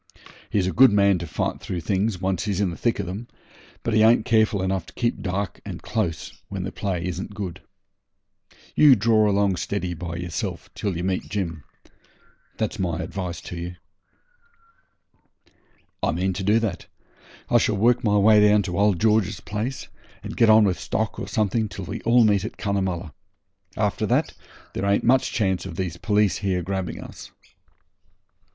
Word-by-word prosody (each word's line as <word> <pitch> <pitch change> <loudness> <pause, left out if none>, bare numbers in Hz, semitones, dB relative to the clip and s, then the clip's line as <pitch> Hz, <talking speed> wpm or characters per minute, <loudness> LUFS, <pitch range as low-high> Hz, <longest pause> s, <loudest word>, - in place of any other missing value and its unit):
He's 100 -3 +1
a 95 - 0
good 130 -2 +7
man 100 -2 +4
to 85 - -5
fight - - -2
through 90 -2 -4
things 100 +5 0
when 95 +1 0
once 90 0 -2
he's 100 -3 -1
in 100 -3 +1
the - - -6
thick 120 +5 0
of - - -3
'em, 100 +7 -6 0.6
but 115 - -1
he 110 - +4
ain't 110 0 +5
careful 110 -3 +2
enough 95 -2 -1
to - - -15
keep 120 -1 -1
dark 100 0 -3
and - - -7
close 100 -8 -3
when - - -4
the - - -4
play 90 -4 -3
isn't 95 +3 -5
good. 95 -3 -5 1.1
You 145 -4 +7
draw 110 0 +3
along 100 -2 +2
steady 90 -2 -2
by 85 0 -6
yourself 90 +1 -5
till 100 -5 -3
you 85 - -3
meet 95 0 -2
Jim 85 -8 -3 0.9
that's 110 0 -2
my 85 -3 -1
advice 90 -1 -5
to - - -8
ye.' 85 +1 -6 2.2
'I - - +1
mean 95 +3 0
to 95 +2 -4
do 105 +3 +4
that. 110 -6 -2 0.6
I - - +6
shall - - +1
work 120 +4 +3
my 105 -2 +3
way 105 +1 +6
down 105 0 +5
to 90 -1 -3
old 100 -4 +3
George's 110 -2 +2
place, 115 +5 -4 0.4
and - - -6
get 115 - +4
on 110 0 +7
with 95 -3 +1
stock 105 +4 -2
or - - -5
something 110 0 0
till 95 -2 -7
we 100 +6 -5
all 120 +1 +4
meet 100 -3 +3
at 110 - -6
Cunnamulla. 95 -5 -2 0.6
After - - 0
that - - +1 0.4
there 100 - -2
ain't 100 0 +2
much 130 +2 +3
chance 95 -6 0
of 85 - -7
these 90 -2 -3
police 105 0 +1
here 95 -3 -1
grabbing 95 0 -3
us.' - - -11
100 Hz, 180 wpm, -24 LUFS, 90-110 Hz, 2.2 s, good